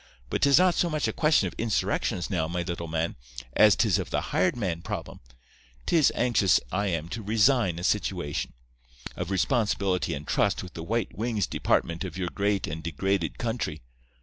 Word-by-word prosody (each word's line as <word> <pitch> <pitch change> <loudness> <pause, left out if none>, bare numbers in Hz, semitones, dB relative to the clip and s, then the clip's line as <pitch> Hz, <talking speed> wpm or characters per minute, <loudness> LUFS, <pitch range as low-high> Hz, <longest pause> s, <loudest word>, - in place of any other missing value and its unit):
But - - -1
'tis 140 -1 +6
not 180 0 +5
so 175 - +1
much 155 -2 0
a - - -2
question 155 - +3
of 85 - -6
insurrections 110 -5 0
now, 80 -4 0
me 85 +1 -2
little 85 -1 -4
man, 80 +1 -2 0.4
as - - +6
'tis - - +2
of - - -4
the - - 0
hired 95 +7 +2
man 90 -7 -2
problem. - - -6 0.7
'Tis 160 -4 +4
anxious 115 -7 +3
I 100 +3 0
am 85 -3 -2
to 115 - -5
resign 110 -3 +2
a 85 - -6
situation 90 -6 -1 0.6
of 90 0 -4
responsibility 95 -1 0
and 75 +1 -7
trust 100 -2 +1
with 90 - -10
the 80 - -7
white 110 +1 -2
wings 110 0 -1
department 85 +2 0
of 90 -2 -6
your 90 -2 -2
great 100 -1 0
and 80 +2 -5
degraded 85 +2 -1
country. 115 - -3
95 Hz, 180 wpm, -27 LUFS, 85-115 Hz, 0.7 s, tis